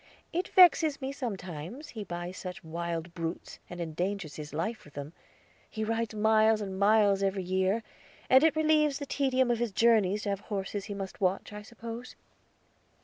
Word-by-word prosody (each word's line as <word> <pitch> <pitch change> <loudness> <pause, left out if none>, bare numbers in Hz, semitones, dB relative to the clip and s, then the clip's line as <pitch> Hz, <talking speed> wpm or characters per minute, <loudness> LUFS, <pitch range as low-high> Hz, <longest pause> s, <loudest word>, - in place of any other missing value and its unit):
It 355 +2 -1
vexes 335 -5 +6
me 265 -1 -3
sometimes, 200 - -6
he 220 -3 -6
buys 175 -1 -5
such 185 -2 -7
wild 170 +1 -4
brutes, 165 0 -5
and 175 - -8
endangers 175 0 -3
his 150 -1 -8
life 170 +10 -3
with 150 - -17
them. 145 +2 -6 0.6
He 220 - -4
rides 225 0 -1
miles 220 0 +4
and 190 -2 -5
miles 200 -1 +4
every 195 -1 0
year; 190 +4 +1 0.4
and 260 +3 +6
it 320 -2 +4
relieves 305 -2 +3
the 285 - -5
tedium 260 -3 +1
of 235 - 0
his 240 -2 -1
journeys 210 -2 +3
to 205 - -2
have 200 -1 -1
horses 200 -1 -4
he 205 - -5
must 195 0 -7
watch, 190 +2 0
I 210 - -6
suppose." 230 +2 -8
205 Hz, 175 wpm, -30 LUFS, 180-235 Hz, 0.6 s, vexes